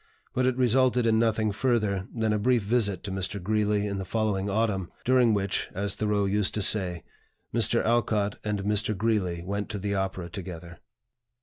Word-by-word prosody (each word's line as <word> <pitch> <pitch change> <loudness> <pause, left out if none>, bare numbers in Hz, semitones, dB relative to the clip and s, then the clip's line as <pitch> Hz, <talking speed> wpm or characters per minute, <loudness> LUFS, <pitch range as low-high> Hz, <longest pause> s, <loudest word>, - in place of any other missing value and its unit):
But 130 0 +1
it 130 -1 0
resulted 125 0 +3
in 110 -1 +3
nothing 110 -2 +1
further 105 -4 0
than 110 -2 0
a 105 - 0
brief 120 +1 +2
visit 100 -4 0
to 100 - -5
Mr. 95 +1 -2
Greeley 105 +1 0
in 100 -1 -3
the - - -3
following 100 -1 -1
autumn, 100 -4 -1
during 125 -2 +4
which, 100 -1 -1
as 100 +1 -1
Thoreau 105 -1 0
used 100 0 0
to 105 - -1
say, 90 -5 +2 0.5
Mr. - - +2
Alcott 110 -3 +1
and 105 -2 -2
Mr. 105 0 0
Greeley 95 -6 0
went 100 +2 -3
to 105 - -3
the 100 +1 -2
opera 95 -2 -2
together. 85 -2 -8
105 Hz, 180 wpm, -27 LUFS, 95-110 Hz, 0.5 s, during